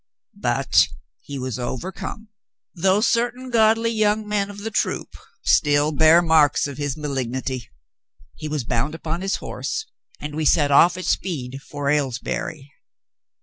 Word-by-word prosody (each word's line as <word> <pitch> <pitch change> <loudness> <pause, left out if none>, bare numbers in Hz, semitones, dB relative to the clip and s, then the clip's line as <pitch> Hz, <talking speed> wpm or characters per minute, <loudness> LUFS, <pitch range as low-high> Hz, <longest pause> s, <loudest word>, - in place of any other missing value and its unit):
"But - - +3 0.3
he 140 - -8
was 130 -2 -4
overcome, 190 - -5 0.4
though 190 +4 +2
certain 245 +2 0
godly 225 0 +3
young 215 -1 +1
men 205 -1 0
of 205 0 -9
the 225 +2 -4
troop - - -1 0.3
still 145 -1 +3
bear 160 +3 +5
marks 155 -3 +4
of 140 -1 -6
his 145 -1 -2
ma 150 -1 -4
lignity. 130 -2 -3 0.7
He 155 - -7
was 150 -3 -2
bound 125 +6 -1
upon 165 +1 -4
his 195 +1 0
horse, 440 - -4 0.3
and 150 0 -6
we 155 +1 -2
set 145 -1 +3
off 175 +6 +6
at 185 - -5
speed 135 -7 -2
for 145 0 -6
Aylesbury. 140 +1 -2
155 Hz, 145 wpm, -22 LUFS, 140-200 Hz, 0.7 s, off